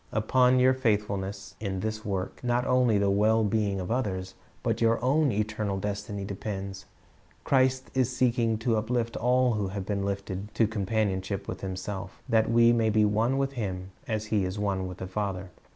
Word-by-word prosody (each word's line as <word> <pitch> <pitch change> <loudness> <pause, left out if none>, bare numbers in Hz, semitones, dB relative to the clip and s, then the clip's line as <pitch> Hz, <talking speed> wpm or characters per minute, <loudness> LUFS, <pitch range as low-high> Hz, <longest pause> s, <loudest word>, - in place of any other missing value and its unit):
Upon 125 +4 +3
your 130 +1 +5
faithfulness 100 -5 -1
in 95 -3 -3
this 110 0 -3
work, 95 +1 -4
not 120 0 +1
only 125 -4 +3
the 100 -1 +2
well 110 +3 +3
being 105 -2 0
of 90 +3 -4
other.?, 105 -7 0 0.4
but - - 0
your 115 0 +3
own 145 +1 +3
eternal 105 -1 -1
destiny 100 0 -4
depends. 95 -1 -5 0.6
Christ 130 -1 +2
is 130 -2 +2
seeking 115 -3 +2
to 115 -3 +3
uplift 115 +1 -1
all 125 0 +3
who 105 -2 -1
will 95 +2 -4
be 100 +2 -3
lifted 100 0 -3
to 115 - +4
companion 105 -2 0
ship 100 +1 -5
with - - -5
Himself, 95 0 -5
that 110 -1 +3
we 115 0 +5
may 115 -2 +2
be 105 0 +4
one 110 +5 +1
with 135 0 0
Him 95 -7 -4 0.2
as 110 -1 -2
He 105 -3 +3
is 95 +2 -3
one 100 -2 -1
with 90 -1 -7
the 95 - -5
Father. 95 -2 -3
105 Hz, 185 wpm, -28 LUFS, 100-115 Hz, 0.6 s, your